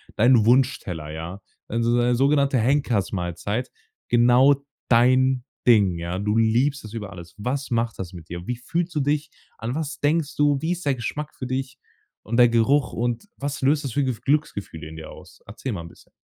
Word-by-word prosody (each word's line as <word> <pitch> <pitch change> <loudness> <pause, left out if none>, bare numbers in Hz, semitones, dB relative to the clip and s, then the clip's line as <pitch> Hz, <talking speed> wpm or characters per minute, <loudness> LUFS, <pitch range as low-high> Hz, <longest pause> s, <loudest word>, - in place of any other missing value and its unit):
dein 120 -1 +5
Wunschteller, 115 - +1
ja? 85 +5 -7 0.3
Also, 115 +1 0
so 120 - +3
eine 120 0 +2
sogenannte 140 +1 +3
Henkersmahlzeit, 105 - 0 0.4
genau 125 +4 +5 0.3
dein 130 +2 +4 0.2
Ding, 100 -7 +5
ja? 85 +2 -4
Du 105 +2 0
liebst 120 +5 +2
es 110 - -10
über 105 -3 -6
alles. 85 -2 -11
Was 130 +6 -3
macht 115 -1 -1
das 90 -1 -6
mit 85 -2 -11
dir? 85 +1 -7
Wie 125 - -1
fühlst 165 +8 -3
du 150 - +1
dich? 145 +2 0 0.3
An 115 +3 -4
was 155 0 -4
denkst 155 +1 0
du? 145 -1 +3
Wie 160 - -1
ist 180 -1 -4
der 140 -2 +2
Geschmack 145 +5 -5
für 130 - -6
dich 135 +1 -3 0.5
und 115 +3 -2
der 120 -1 +7
Geruch? 125 +5 +2
Und 120 - -2
was 140 0 -4
löst 145 +3 +2
das 135 - -3
für 140 +5 0
Gefü 125 -4 -3
Glücksgefühle 100 - -2
in 80 - -10
dir 80 -1 -9
aus? - - -15
Erzähle 115 +4 -5
mal 90 - -4
'n 85 - -10
bisschen. - - -20
120 Hz, 195 wpm, -24 LUFS, 105-140 Hz, 0.5 s, der